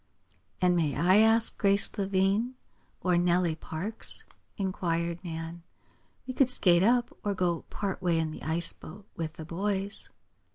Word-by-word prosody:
"And 180 -1 +4
may 155 -5 +1
I 180 +6 +4
ask 225 +1 +4
Grace 200 0 +4
Lavine 200 +4 +1 0.5
or 180 -2 +2
Nellie 175 -1 +2
Parks?" 180 +8 -3 0.3
inquired 170 -3 -2
Nan. 165 0 -6 0.6
"We 255 - -5
could 260 0 +3
skate 175 -8 +4
up, 240 +4 +2
or 205 -1 -1
go 175 -3 -1
part 195 -2 -4
way 175 -3 +1
in 160 -1 -1
the - - -9
ice 165 +2 +2
boat 195 +5 -12
with 160 -1 -4
the 160 - -9
boys." 195 +4 -2
180 Hz, 150 wpm, -29 LUFS, 170-205 Hz, 0.6 s, And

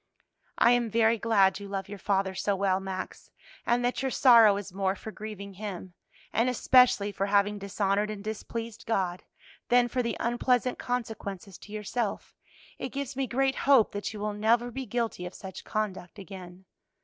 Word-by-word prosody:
"I 235 - +5
am 240 -1 +2
very 225 +1 +3
glad 200 -4 +3
you 200 - -8
love 195 -1 -4
your 200 0 -8
father 195 -1 0
so 200 +2 0
well, 190 -1 +1
Max, 190 -1 -6 0.4
and 245 +1 +2
that 245 - -1
your 265 - 0
sorrow 230 -6 +6
is 200 -2 -7
more 195 0 0
for 220 - -8
grieving 210 -2 -8
him, 190 -2 -7 0.4
and 230 +4 +2
especially 250 -4 +4
for 195 0 -2
having 205 +1 +2
dishonored 200 +1 0
and 210 -2 -6
displeased 225 +1 -6
God, 185 -5 -1 0.5
than 245 0 +5
for 250 +1 -1
the 235 -2 -2
unpleasant 245 +1 +1
consequences 215 -6 -5
to 205 - -13
yourself; 215 +1 -3 0.4
it 260 - -4
gives 275 0 -5
me 270 0 -1
great 270 +2 +1 0.2
hope 260 -6 +6
that 205 0 -4
you 215 - -8
will 210 0 -2
never 230 +3 +2
be 265 +1 -5
guilty 225 -5 -2
of 180 - -11
such 190 -1 -9
conduct 205 -4 -4
again. 185 -1 -10
210 Hz, 175 wpm, -28 LUFS, 195-240 Hz, 0.5 s, sorrow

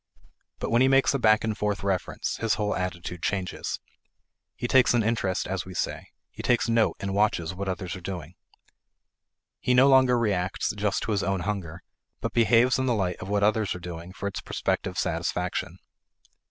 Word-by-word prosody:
But - - -4
when 120 +1 +4
he 130 - +6
makes 135 +1 +4
a 140 - 0
back 110 -2 +4
and 110 -1 -1
forth 105 -1 -2
reference, 95 -2 -2
his 115 -2 +1
whole 105 -1 -1
attitude 90 -2 -4
changes. 95 -2 -2 0.8
He 120 - -3
takes 130 -1 +5
an 115 - +3
interest, 105 -4 0
as 95 -2 -2
we 95 +1 -10
say; - - -3 0.2
he - - -8
takes 120 -1 +2
note 115 -1 +2
and 100 0 -3
watches 100 -5 +1
what 95 +1 -4
others 90 -1 -4
are 95 - -9
doing. 85 -2 -6 1.3
He 125 - +1
no 130 +2 +7
longer 130 -2 +5
reacts 100 -5 0
just 105 -1 -1
to - - -2
his 100 -2 +1
own 95 -1 -1
hunger, 90 -4 -4 0.4
but - - -4
behaves 120 +2 +4
in 130 - 0
the 120 - +2
light 90 -4 -1
of 95 - -8
what 100 0 +1
others 110 -1 +2
are - - -6
doing 85 0 -8
for 95 +1 -8
its 100 - -4
prospective - - -2
satisfaction. - - -2
100 Hz, 190 wpm, -26 LUFS, 90-115 Hz, 1.3 s, no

